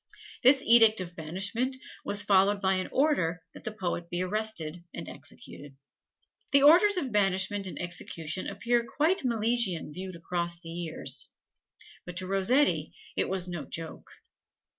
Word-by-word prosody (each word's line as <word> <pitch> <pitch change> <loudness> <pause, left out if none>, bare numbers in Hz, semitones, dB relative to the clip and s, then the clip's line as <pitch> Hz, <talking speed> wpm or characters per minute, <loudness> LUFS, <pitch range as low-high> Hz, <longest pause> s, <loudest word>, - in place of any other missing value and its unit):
This 265 +2 +6
edict 225 -2 +7
of 175 -1 -7
banishment 200 +11 -2 0.3
was 205 0 +2
followed 200 0 +3
by 190 -1 +1
an 185 - -3
order 180 - +1
that - - -13
the 220 - -4
poet 175 -4 -4
be 175 +1 -1
arrested 185 -5 -2
and - - -7
executed. 145 -1 -7 0.8
The 280 0 +5
orders 365 +7 +6
of 275 -8 -2
banishment 195 -1 +1
and - - -7
execution 170 -1 -4
appear 240 0 0
quite 305 - 0
Milesian 225 - +1
viewed 185 +1 -6
across 170 0 -2
the 165 - -9
years, 165 -1 -2 0.7
but 180 -1 -9
to 185 - -3
Rossetti 195 +10 +1 0.2
it - - -1
was 185 -1 -1
no 175 -3 -5
joke. 165 -1 -7
190 Hz, 145 wpm, -28 LUFS, 175-235 Hz, 0.8 s, edict